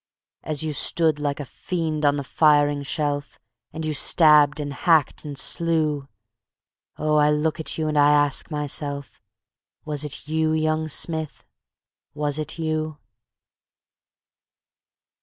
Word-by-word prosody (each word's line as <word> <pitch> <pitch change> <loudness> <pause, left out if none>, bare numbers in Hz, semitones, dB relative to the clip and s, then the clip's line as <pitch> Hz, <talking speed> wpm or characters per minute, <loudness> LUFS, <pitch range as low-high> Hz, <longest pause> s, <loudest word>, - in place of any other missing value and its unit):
As 155 0 -4
you 155 -1 -2
stood 160 0 0
like 145 -1 -2
a 145 - -4
fiend 160 0 -3
on 145 0 +4
the 140 - -3
firing 145 0 +3
shelf 145 0 -3 0.3
And 160 0 -5
you 155 - -1
stabbed 150 -1 +5
and 145 -1 -4
hacked 155 +1 +2
and 145 -2 -7
slew.... 155 -3 0 0.9
Oh, 150 0 +1
I 150 0 +4
look 155 +2 0
at 160 - -4
you 160 -1 -1
and 150 -1 +1
I 145 0 +6
ask 145 0 +2
myself, 145 -3 -5 0.6
Was 150 -1 -2
it 150 0 -7
you, 155 0 +1
young 155 0 0
Smith, 155 +1 -3 0.7
was 145 0 -1
it 155 - -4
you? 155 -1 -2
150 Hz, 135 wpm, -23 LUFS, 145-155 Hz, 0.9 s, I